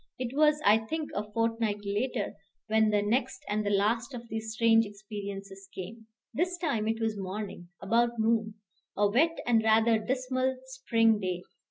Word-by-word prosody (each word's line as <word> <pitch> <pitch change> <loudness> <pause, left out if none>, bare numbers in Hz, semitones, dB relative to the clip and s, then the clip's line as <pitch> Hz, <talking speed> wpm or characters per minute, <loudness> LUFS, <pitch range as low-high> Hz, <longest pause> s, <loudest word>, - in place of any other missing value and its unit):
It 255 0 -4
was, 300 0 +4
I 210 +2 +6
think, 305 +8 -4
a 210 +1 -4
fortnight 225 -2 -1
later 210 +2 -1 0.3
when 220 0 +3
the 205 -1 +2
next 245 +5 -1
and 215 +1 0
last 225 +5 +1
of 235 -1 -8
these 220 0 -4
strange 225 0 +4
experiences 200 -2 -8
came. 220 +4 -8 0.3
This 360 +3 0
time 275 -11 -1
it 225 0 0
was 220 -2 -1
morning, 190 -2 -6
about 235 +4 +2
noon, 220 -1 +1 0.4
a 205 - +4
wet 305 +11 +2
and 230 -2 +3
rather 220 +1 +4
dismal 255 +2 -1
spring 230 -4 +2
day. 180 -2 -3
225 Hz, 160 wpm, -29 LUFS, 205-240 Hz, 0.4 s, I